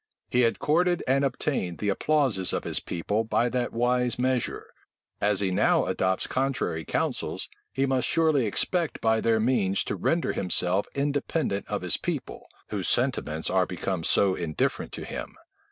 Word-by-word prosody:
He 125 - +3
had 115 -1 +2
courted 175 +3 +2
and 135 +2 +3
obtained 130 - -1
the 105 - -1
applauses 130 -4 +1
of - - -1
his - - +1
people 105 +6 -2
by 115 +2 +1
that 125 0 -1
wise 125 +1 +1
measure: 125 -1 -1 0.5
as 105 -1 +2
he 95 -2 +1
now 90 - +3
adopts 95 0 0
contrary 130 -11 -1
counsels, - - -2 0.2
he 135 - 0
must 130 -2 +1
surely 155 -7 +2
expect 170 - 0
by 110 0 +2
their 115 -1 +2
means 110 -5 +1
to - - -3
render 165 - 0
himself 90 +1 +1
independent 140 - -1
of - - -3
his - - +1
people, - - -5 0.2
whose - - -2
sentiments 80 +1 0
are 95 -1 +2
become 90 -1 -3
so 95 +3 +3
indifferent 85 -4 -2
to - - -5
him. - - -6
115 Hz, 160 wpm, -27 LUFS, 95-135 Hz, 0.5 s, He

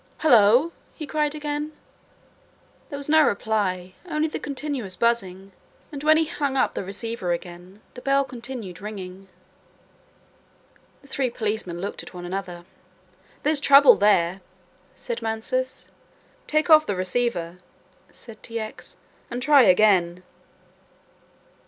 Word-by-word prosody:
"Hullo," 245 +2 +5 0.2
he 310 - -6
cried 300 0 -1
again. 295 0 -4 1.2
There 285 - -6
was 280 - -5
no 315 +1 +5
reply, 200 -7 -1
only 310 -1 0
the 310 - -5
continuous 275 -8 -3
buzzing, 195 -4 -1 0.4
and 285 -1 -7
when 310 +1 +5
he 320 - +2
hung 285 -4 -2
up - - +1
the - - -4
receiver 195 -1 -3
again, 175 +3 -9
the 250 - -10
bell 275 +1 +2
continued 235 -8 -8
ringing. 195 -2 -8 1.8
The - - -17
three 265 -1 -1
policemen 215 -7 -3
looked 200 +3 -4
at - - -13
one 175 0 -7
another. 175 -1 -6 0.8
"There's 300 0 +2
trouble 280 -1 +7
there," 190 -2 +2 0.5
said 235 -1 -5
Mansus. 225 - -3 0.6
"Take 310 0 +1
off 310 -2 +6
the 205 - -1
receiver," 185 -2 -2 0.5
said 230 -2 -13
T. 230 0 -5
X., 220 0 -8 0.3
"and 240 - -4
try 285 +2 +5
again." 185 -4 +3
230 Hz, 125 wpm, -24 LUFS, 190-285 Hz, 1.8 s, trouble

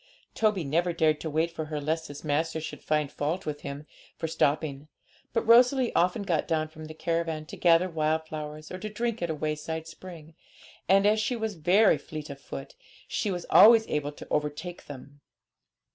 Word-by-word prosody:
Toby 210 -5 +1
never 170 +5 0
dared 155 -2 +2
to 160 - -3
wait 160 +3 0
for 160 -2 -5
her, 155 -1 -4
lest 160 +3 -2
his 145 0 -9
master 160 +2 0
should 160 - -7
find 150 -2 0
fault 155 +6 -2
with 150 -1 -4
him 140 +1 -7 0.3
for 165 - -3
stopping; 150 -2 0 0.4
but 230 - -1
Rosalie 245 +2 +5
often 180 +3 +2
got 170 -6 0
down 155 -1 0
from 155 0 -10
the 155 0 -9
caravan, 165 -1 -2
to - - -9
gather 170 +1 +4
wild 160 -1 0
flowers, 155 0 -7
or 185 - -6
to 215 - -5
drink 235 +2 -3
at 170 - -1
a 160 - -1
wayside 155 +1 -3
spring, 165 -2 -11 0.6
and, 195 +1 +5
as 215 +1 +4
she 225 +3 0
was 220 -2 -3
very 180 +1 +4
fleet 150 0 -8
of 140 0 -10
foot, - - -8 0.3
she 210 - -2
was 180 -3 -3
always 225 +1 +8
able 150 -1 -2
to - - -11
overtake 150 +4 -3
them. 145 +1 -11
160 Hz, 190 wpm, -28 LUFS, 150-185 Hz, 0.6 s, always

